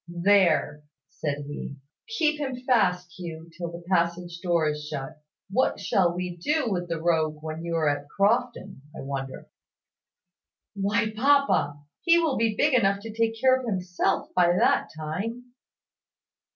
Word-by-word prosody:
"There!" 175 -4 +2 0.3
said 145 -2 -3
he. 145 -1 -6 0.4
"Keep 305 -2 +2
him 265 -3 -2
fast, 180 -8 +2
Hugh, 165 -1 -8
till 170 0 -5
the 170 0 -9
passage 175 -1 0
door 170 -3 +1
is 150 0 -2
shut. 150 +1 -6 0.3
What 255 +6 +1
shall 180 -3 +2
we 180 -1 -4
do 295 - 0
with 175 -2 -2
the 165 -1 -2
rogue 160 -2 +1
when 160 +1 -5
you 170 0 -2
are 160 -2 +1
at 145 0 -1
Crofton, 200 - 0 0.2
I - - -6
wonder?" 135 -1 -5 1.3
"Why, 205 +2 0
papa! 250 - +2 0.2
He 340 -1 +5
will 325 -5 +1
be 225 -2 +1
big 290 +6 +2
enough 200 -5 +3
to 225 0 -8
take 225 0 0
care 260 +2 +5
of 260 -2 -4
himself 185 -1 -1
by 175 -1 +4
that - - +3
time." 225 +11 -5
180 Hz, 150 wpm, -26 LUFS, 160-225 Hz, 1.3 s, He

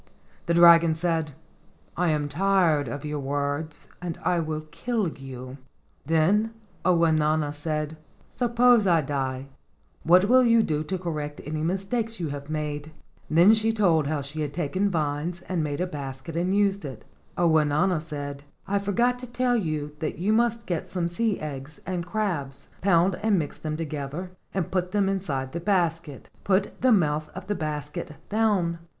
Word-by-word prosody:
The 170 - +2
dragon 170 -1 +7
said, 160 -2 -1 0.6
"I 180 -1 +1
am 150 -2 0
tired 170 -3 +2
of 140 +4 -5
your 150 0 -3
words 145 +2 -3
and 175 -2 -4
I 175 - +2
will 155 -1 -2
kill 210 +3 -1
you." 130 -2 -9 0.5
Then 200 +8 +2 0.3
Ounauna 155 -4 +2
said, 150 +1 -3 0.3
"Suppose 240 -3 +4
I 170 -3 +4
die, 135 -1 -3 0.5
what 180 +3 +5
will 255 +4 +5
you 230 -2 +5
do 155 -4 -1
to 190 +5 -2
correct 150 -4 -4
any 155 +1 -3
mistakes 200 +6 -2
you 165 -3 -2
have 140 0 -6
made?" 150 -1 -3 0.4
Then 170 +7 +6
she 225 0 +2
told 175 -9 +2
how 150 -1 -1
she 145 +3 -4
had 145 -1 -3
taken 180 +5 0
vines 155 +1 -2
and 175 -4 -1
made 145 0 -3
a 180 - +1
basket 140 -2 -6
and 175 +2 0
used 200 -1 +2
it. 130 -7 -8 0.3
Ounauna 160 +1 +3
said: 145 -3 -6 0.2
"I 200 +1 +1
forgot 235 +5 +1
to 250 - -8
tell 245 +1 +1
you 155 -8 -2
that 155 - -3
you 200 +5 +1
must 230 0 +1
get 175 -3 -2
some 175 -3 -2
sea 210 +4 0
eggs 145 0 -7
and 180 -1 -3
crabs, 170 -10 -3
pound 180 -1 +3
and 215 -2 +3
mix 150 -4 -3
them 155 -1 -3
together 155 +3 -5 0.2
and 190 -4 -2
put 180 0 -1
them 200 -2 +2
inside 150 -10 -2
the 170 - -3
basket. 170 -6 -1 0.2
Put 195 0 0
the 255 - +4
mouth 155 -7 +2
of 185 0 -7
the 205 - -1
basket 150 0 -4
down. 200 -6 +1
165 Hz, 165 wpm, -26 LUFS, 150-195 Hz, 0.6 s, dragon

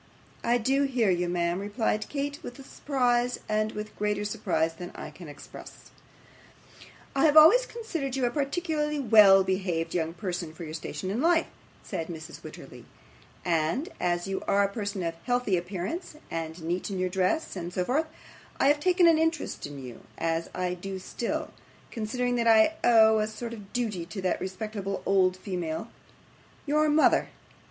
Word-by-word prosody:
'I 240 +1 +3
do 270 +4 +2
hear 245 -7 +2
you, 175 0 0
ma'am,' 175 0 0
replied 210 +1 -1
Kate, 285 0 -3
'with 245 - -8
surprise 245 -4 0
with 215 0 -2
greater 210 0 -1
surprise 185 -7 0
than 175 +2 -8
I - - -7
can 175 - -11
express.' 145 - -12 1.2
'I 275 - +4
have 305 0 +5
always 430 +12 +8
considered 330 - -4
you 265 -2 +1
a 240 - +1
particularly 300 +1 -1
well 210 -6 +7
behaved 185 -3 -1
young 165 -1 -1
person 175 -4 -4
for 170 - -8
your 155 -1 -7
station 175 +4 -5
in 225 +6 -1
life,' 335 +1 +3 0.3
said 165 - -4
Mrs. 165 -1 -8
Wititterly; - - -11 0.6
'and 170 - 0
as 175 0 0
you 195 0 -2
are 200 0 +4
a - - +3
person 205 -3 -3
of 165 -1 -1
healthy 245 -5 +1
appearance, 190 - -4 0.2
and 165 0 -5
neat 175 +5 -2
in 195 - -3
your 185 0 0
dress 190 - 0
and 175 -1 -5
so 180 0 -1
forth, 305 - +1 0.5
I 275 - +5
have 290 0 +3
taken 360 +2 +4
an 330 -2 +6
interest 325 - -1
in 145 0 -9
you, 125 -3 -9 0.2
as 165 0 -1
I 180 -1 -1
do 190 +2 -6
still, 275 +11 -4 0.4
considering 245 +2 -1
that 235 -1 +1
I 225 +7 +6
owe 220 -2 +6
a 215 - +1
sort 230 +2 -6
of 205 -3 -11
duty 215 -9 -2
to 195 +1 -6
that 185 - 0
respectable 195 +1 -4
old 185 -2 +3
female, 180 +1 -4 0.8
your 300 +1 +2
mother. 300 +1 +4
210 Hz, 170 wpm, -28 LUFS, 180-260 Hz, 1.2 s, always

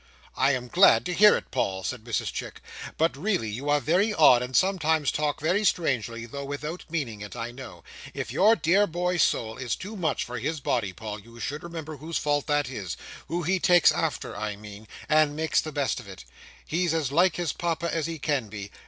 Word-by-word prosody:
"I 135 +2 +3
am 125 -1 -3
glad 185 +10 +5
to 180 - -2
hear 210 +4 +7
it, - - -10
Paul," 95 -1 -1
said 125 0 -4
Mrs 115 -1 -2
Chick; - - -6 0.4
"but 160 -2 +2
really 170 - -1
you 135 +7 -4
are 145 0 +4
very 180 - +2
odd, 130 -8 +6
and 125 +1 -4
sometimes 160 -6 +2
talk 150 -1 -1
very 180 +8 +1
strangely, 120 - 0
though 140 +4 -7
without 150 +5 -5
meaning 130 -11 -3
it, 105 +2 -8
I 120 0 -4
know. 115 -10 -11 0.3
If - - -4
your 215 +4 +5
dear 200 +3 +3
boy's 180 +1 0
soul 110 0 +1
is 130 -2 -2
too 205 +4 -8
much 175 -6 -1
for 120 0 -5
his 155 +6 -2
body, 115 -7 -1
Paul, 105 +4 -7
you 115 +3 -15
should 145 +6 -4
remember 160 -3 -7
whose 160 +4 -4
fault 145 -1 0
that 145 -2 +1
is—who 125 - -6
he 185 +4 +1
takes 175 -2 +5
after, - - -2
I 105 -1 -3
mean—and 110 +9 -1
make 160 +1 -3
the 155 - +1
best 140 -3 -1
of 120 - -12
it. 95 -1 -11 0.4
He's 170 0 0
as 150 -5 -1
like 175 +3 +3
his 175 -5 -2
Papa 170 0 -2
as 160 -2 -1
he 165 -1 -4
can 145 -5 -1
be. 100 -1 -7
145 Hz, 205 wpm, -26 LUFS, 120-170 Hz, 0.4 s, hear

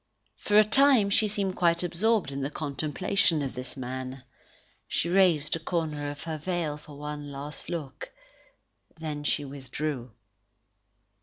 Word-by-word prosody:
For 205 - +2
a 215 - +9
time, 230 -2 +5
she 215 +1 +4
seemed 200 -2 -1
quite 170 0 +3
absorbed 185 0 +1
in 140 0 -4
the 135 - -1
contemplation 155 +4 0
of 135 - -3
this 125 +2 -6
man. 130 0 -5 0.6
She 170 - 0
raised 175 -5 +4
a - - -3
corner 155 -3 -2
of 145 0 -7
her 160 -2 -4
veil 170 -2 -1
for 150 -1 -13
one 145 0 -6
last 145 +2 -5
look. 150 -6 -5 0.9
Then 150 -2 -4
she 145 0 +1
withdrew. 135 -1 -4
150 Hz, 145 wpm, -28 LUFS, 140-180 Hz, 0.9 s, a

